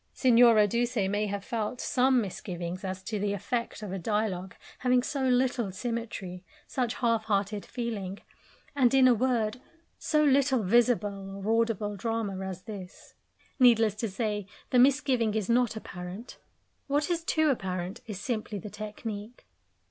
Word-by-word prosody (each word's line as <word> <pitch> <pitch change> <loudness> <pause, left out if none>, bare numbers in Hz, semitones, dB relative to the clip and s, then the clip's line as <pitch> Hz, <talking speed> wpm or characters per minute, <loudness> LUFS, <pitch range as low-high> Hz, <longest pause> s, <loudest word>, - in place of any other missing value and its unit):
Signora 235 -4 +6
Duse 240 +4 -1
may 205 +2 0
have 200 0 -4
felt 230 +1 -3
some 255 0 +3
misgivings 180 -2 -5
as 190 0 -4
to 215 0 -3
the 205 0 0
effect 220 +3 -3
of 205 - -5
a 190 - -3
dialogue 190 -2 -2 0.2
having 250 -1 +3
so 270 -1 -1
little 250 -4 +1
symmetry, 205 -4 -5 0.2
such 245 -4 -2
half 230 -2 +1
hearted 205 0 0
feeling, 210 -6 -4 0.6
and, 260 -2 +4
in 260 -1 +7
a 250 - +6
word, 235 -1 0 0.4
so 305 -1 +2
little 270 -4 +3
visible 205 -3 +1
or 225 +2 +3
audible 210 -2 -2
drama 215 -2 -2
as 190 -1 -6
this. 200 -3 -10 0.5
Needless 230 -4 +5
to 225 0 -2
say, 210 -1 -2 0.2
the 250 - +4
misgiving 255 -4 +3
is 215 -3 -1
not 240 -1 +2
apparent; 190 +2 -8 0.5
what 290 +4 +1
is 335 -1 -1
too 315 -2 +2
apparent 185 -3 -3
is 205 -4 -5
simply 215 -2 -3
the 200 +2 -8
technique. 215 +1 -7
220 Hz, 150 wpm, -29 LUFS, 200-245 Hz, 0.6 s, in